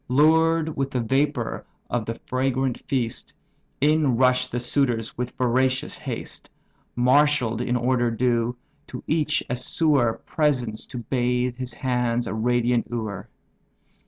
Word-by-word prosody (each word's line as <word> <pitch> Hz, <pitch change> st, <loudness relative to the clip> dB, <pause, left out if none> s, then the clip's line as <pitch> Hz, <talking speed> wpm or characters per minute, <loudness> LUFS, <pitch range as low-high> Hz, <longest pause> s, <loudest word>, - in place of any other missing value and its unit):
Lured 160 Hz, +3 st, +3 dB
with 135 Hz, 0 st, -1 dB
the 130 Hz, -, -2 dB
vapour 135 Hz, +1 st, 0 dB, 0.2 s
of 120 Hz, -3 st, -2 dB
the 115 Hz, -, -2 dB
fragrant 130 Hz, -1 st, 0 dB
feast, 120 Hz, -4 st, -3 dB, 0.4 s
In 150 Hz, -2 st, +3 dB
rush'd 125 Hz, +1 st, +2 dB
the 120 Hz, -, -1 dB
suitors 120 Hz, -3 st, 0 dB
with 125 Hz, 0 st, -5 dB
voracious 130 Hz, +1 st, +1 dB
haste; -, -, -6 dB, 0.5 s
Marshall'd 125 Hz, -2 st, +3 dB
in 125 Hz, 0 st, 0 dB
order 120 Hz, 0 st, +1 dB
due, 120 Hz, 0 st, 0 dB, 0.3 s
to -, -, -8 dB
each 150 Hz, -2 st, +1 dB
a 125 Hz, -, -1 dB
sewer 125 Hz, -1 st, +2 dB
Presents, 125 Hz, -8 st, 0 dB
to -, -, -8 dB
bathe 125 Hz, 0 st, 0 dB
his 125 Hz, -1 st, -6 dB
hands, 125 Hz, -2 st, 0 dB
a -, -, -4 dB
radiant 120 Hz, +1 st, +1 dB
ewer. 110 Hz, -5 st, -5 dB
125 Hz, 130 wpm, -24 LUFS, 120-135 Hz, 0.5 s, Lured